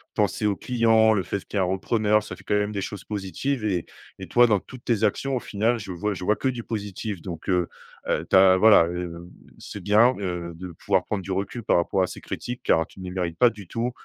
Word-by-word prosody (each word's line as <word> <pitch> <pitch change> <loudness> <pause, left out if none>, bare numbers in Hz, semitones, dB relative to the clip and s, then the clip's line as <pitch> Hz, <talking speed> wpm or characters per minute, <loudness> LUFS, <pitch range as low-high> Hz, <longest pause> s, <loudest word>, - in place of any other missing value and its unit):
pensé - - 0
aux 100 -2 +2
clients, 115 -2 +3
le 95 -4 0
fait 100 - -4
qu'il 105 - -5
y - - +3
a - - +3
un - - +1
repreneur. 105 +2 +1
Ça - - -7
fait - - -17
quand 105 - 0
même 105 0 0
des 100 - -2
choses 100 -1 -6
positives, 105 +6 -3
et 95 -5 -1 0.3
et - - -7
toi 120 0 +5
dans 105 -3 +3
toutes 130 +4 -13
tes 115 -4 0
actions 135 -1 0
au - - 0
final, 115 +2 0
je 100 -3 -7
vois 100 +4 -2
je 90 - -7
vois 105 - +3
que 135 - -2
du 120 -2 -4
positif, 105 -3 -5
donc 85 -4 -8
heu 90 -2 +1 0.4
heu, - - 0
tu - - +3
as 95 0 +7
voilà, 105 -4 +7
hem, 85 0 -6 0.3
c'est 105 - -8
bien, 110 +6 +5
heu, 90 -3 -4
de 90 +1 -8
pouvoir 95 +1 0
prendre 100 -3 -3
du 95 - -6
recul. 100 +5 -3
Par - - +3
rapport 85 +3 +1
à 90 - 0
ces - - -9
critiques, 125 0 -6
car 80 0 +3
tu - - -17
ne 95 - -7
les 90 - -5
mérites 85 -3 -3
pas 120 - +6
du 100 -6 -12
tout, 120 +5 -2
100 Hz, 260 wpm, -24 LUFS, 90-110 Hz, 0.4 s, as